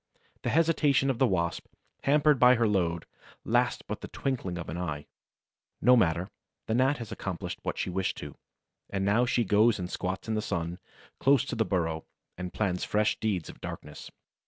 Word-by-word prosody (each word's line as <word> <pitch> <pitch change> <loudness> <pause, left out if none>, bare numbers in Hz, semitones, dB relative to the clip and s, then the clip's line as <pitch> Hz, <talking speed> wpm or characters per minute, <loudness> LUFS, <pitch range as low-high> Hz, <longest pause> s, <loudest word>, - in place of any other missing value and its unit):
The - - -1
hesitation 150 -4 +3
of 125 - -5
the 130 - +5
Wasp, 85 -4 -1 0.4
hampered 150 0 +4
by 125 +1 +7
her 115 -1 +2
load, 85 -5 0 0.4
lasts - - +1
but - - -5
the - - -6
twinkling 120 -10 -3
of 85 - -6
an - - -5
eye. 75 -5 -4 0.7
No 125 0 +6
matter: 90 -5 +2 0.3
the 110 - -1
Gnat 130 +5 +3
has 115 -3 -7
accomplished 90 -3 -5
what - - -3
she - - -2
wished 95 +1 -1
to, - - -7 0.6
and 95 -1 -1
now 115 +5 +3
she 120 -1 +2
goes 110 +2 +4
and 90 -1 -5
squats 95 +3 -3
in 110 - -1
the 110 - 0
sun, 85 -3 -3 0.4
close 135 -2 +4
to - - -4
the 110 -1 +1
burrow, 80 -5 -1 0.3
and 90 0 -5
plans 90 -4 -1
fresh 105 0 +1
deeds 100 -7 -1
of - - -11
darkness. 75 0 -8
105 Hz, 185 wpm, -29 LUFS, 90-125 Hz, 0.7 s, by